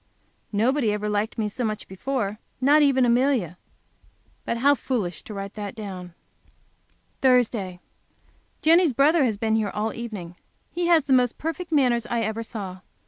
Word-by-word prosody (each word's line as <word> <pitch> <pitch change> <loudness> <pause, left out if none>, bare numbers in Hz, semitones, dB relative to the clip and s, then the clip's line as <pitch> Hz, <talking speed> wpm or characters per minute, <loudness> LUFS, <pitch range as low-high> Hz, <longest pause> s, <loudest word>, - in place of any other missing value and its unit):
Nobody 230 +3 +2
ever 210 0 -2
liked 210 +2 -1
me 220 -2 0
so 225 +4 -4
much 215 -2 -3
before, 210 +1 -3 0.2
not 285 +4 +5
even 270 -3 +4
Amelia. 240 - +2 0.9
But 235 - -1
how 280 +4 +5
foolish 215 - -3
to 215 - -9
write 195 0 -6
that 205 -1 -6
down! 185 -5 -8 1.1
Thursday. 230 -8 +2 0.8
Jenny's 330 -2 +5
brother 295 +5 +4
has 220 -4 -1
been 220 +1 0
here 215 -2 0
all 215 +2 -2
evening. 205 -7 -7 0.3
He 345 0 -1
has 335 -3 +5
the 275 -1 +1
most 250 -2 +3
perfect 330 +2 -4
manners 245 -6 +2
I 235 -1 -1
ever 220 +1 -2
saw. 200 -5 -7
230 Hz, 155 wpm, -24 LUFS, 205-270 Hz, 1.1 s, not